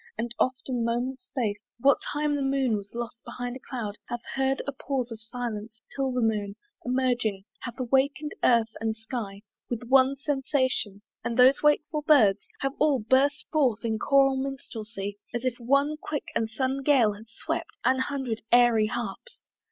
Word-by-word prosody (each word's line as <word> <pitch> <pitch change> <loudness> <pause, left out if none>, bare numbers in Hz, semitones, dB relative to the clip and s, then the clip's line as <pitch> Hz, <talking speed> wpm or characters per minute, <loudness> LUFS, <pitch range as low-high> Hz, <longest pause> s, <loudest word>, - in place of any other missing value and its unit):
and 235 0 -3
oft, 255 0 0
a - - -4
moment's 245 +2 -1
space, 215 -7 -2 0.2
What 275 +3 +5
time 295 0 -1
the 285 - -1
moon 270 -4 +1
was 200 +1 -7
lost 235 -1 -5
behind 245 0 -5
a - - -7
cloud, 220 -6 -5
Hath 240 0 -4
heard 270 0 +1
a 280 - -2
pause 265 -3 -3
of 225 -1 -7
silence: 225 -1 -5 0.2
till 270 -1 0
the 250 -1 0
Moon 205 -2 0 0.3
Emerging, 245 -6 0 0.2
hath 240 +1 -7
awaken'd 270 +4 +1
earth 230 -2 +4
and 220 -1 0
sky 220 -3 -6 0.3
With 240 -1 -3
one 265 +1 +5
sensation, 260 -7 -1 0.2
and 235 - -2
those 255 +2 +6
wakeful 300 0 +2
Birds 225 -10 +4
Have 270 0 0
all 290 -3 +4
burst 270 +6 +2
forth 255 -8 +2
in 220 -1 0
choral 270 +1 +4
minstrelsy, 220 -7 -5 0.2
As 240 +2 -2
if 255 -1 -1
one 280 +5 +2
quick 295 -2 -3
and 225 - 0
sudden 260 +4 -1
Gale 260 -7 +4
had 215 +2 -12
swept - - -4
An 260 +1 +4
hundred 260 -5 -2
airy 240 -3 +5
harps! 240 - -5
250 Hz, 170 wpm, -27 LUFS, 225-270 Hz, 0.3 s, those